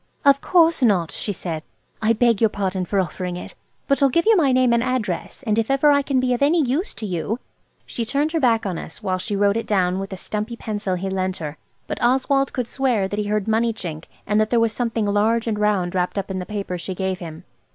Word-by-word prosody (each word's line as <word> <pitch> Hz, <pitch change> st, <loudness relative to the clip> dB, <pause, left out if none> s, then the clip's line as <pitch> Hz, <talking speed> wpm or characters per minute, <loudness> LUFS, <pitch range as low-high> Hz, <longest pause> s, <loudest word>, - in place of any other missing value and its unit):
"Of 280 Hz, 0 st, +5 dB
course 335 Hz, -4 st, +3 dB
not," 190 Hz, -9 st, +3 dB
she 210 Hz, -, -3 dB
said; 165 Hz, -4 st, -5 dB, 0.4 s
"I 220 Hz, +1 st, +3 dB
beg 230 Hz, -1 st, +2 dB
your 225 Hz, -, +5 dB
pardon 190 Hz, -3 st, -2 dB
for 200 Hz, +2 st, 0 dB
offering 180 Hz, -1 st, -3 dB
it. -, -, -8 dB, 0.3 s
But 275 Hz, +1 st, +2 dB
I'll 275 Hz, -, +5 dB
give 335 Hz, +6 st, +1 dB
you 450 Hz, 0 st, +6 dB
my 300 Hz, -8 st, +3 dB
name 255 Hz, -1 st, +3 dB
and 235 Hz, -, +3 dB
address, 240 Hz, -5 st, -2 dB
and 215 Hz, -1 st, +2 dB
if 225 Hz, -, -1 dB
ever 275 Hz, +2 st, +4 dB
I 285 Hz, 0 st, +4 dB
can 275 Hz, -1 st, 0 dB
be 255 Hz, 0 st, +1 dB
of 245 Hz, -, -2 dB
any 305 Hz, +5 st, +4 dB
use 295 Hz, -, 0 dB
to 220 Hz, -, -5 dB
you–" 195 Hz, +4 st, -2 dB, 0.5 s
She 235 Hz, -, -3 dB
turned 280 Hz, +6 st, 0 dB
her 325 Hz, -, 0 dB
back 230 Hz, -6 st, +2 dB
on 185 Hz, -4 st, -2 dB
us -, -, -9 dB
while 185 Hz, -1 st, -1 dB
she 205 Hz, +2 st, -3 dB
wrote 200 Hz, +1 st, +2 dB
it 230 Hz, -, -3 dB
down 185 Hz, -2 st, +1 dB
with 195 Hz, 0 st, -5 dB
a 190 Hz, -, -5 dB
stumpy 215 Hz, +5 st, -4 dB
pencil 205 Hz, -4 st, -3 dB
he 185 Hz, +2 st, -3 dB
lent 190 Hz, -1 st, -1 dB
her; 150 Hz, -2 st, -5 dB, 0.3 s
but -, -, -5 dB
Oswald 265 Hz, +2 st, +2 dB
could 250 Hz, -, -2 dB
swear 245 Hz, -8 st, 0 dB
that 205 Hz, +2 st, -3 dB
he 210 Hz, -, -1 dB
heard 210 Hz, 0 st, -1 dB
money 225 Hz, +1 st, +2 dB
chink, 165 Hz, -7 st, -7 dB, 0.2 s
and 210 Hz, +1 st, +2 dB
that 215 Hz, -, +1 dB
there 240 Hz, -, +3 dB
was 230 Hz, -1 st, +2 dB
something 230 Hz, -2 st, -1 dB
large 215 Hz, +3 st, +2 dB
and 215 Hz, -3 st, -1 dB
round 200 Hz, -4 st, +1 dB
wrapped 180 Hz, +1 st, -1 dB
up 195 Hz, 0 st, -2 dB
in 185 Hz, -, -2 dB
the 180 Hz, -, -6 dB
paper 200 Hz, -4 st, -4 dB
she 185 Hz, +2 st, -5 dB
gave 190 Hz, 0 st, -2 dB
him. 165 Hz, 0 st, -8 dB
215 Hz, 250 wpm, -22 LUFS, 190-250 Hz, 0.5 s, you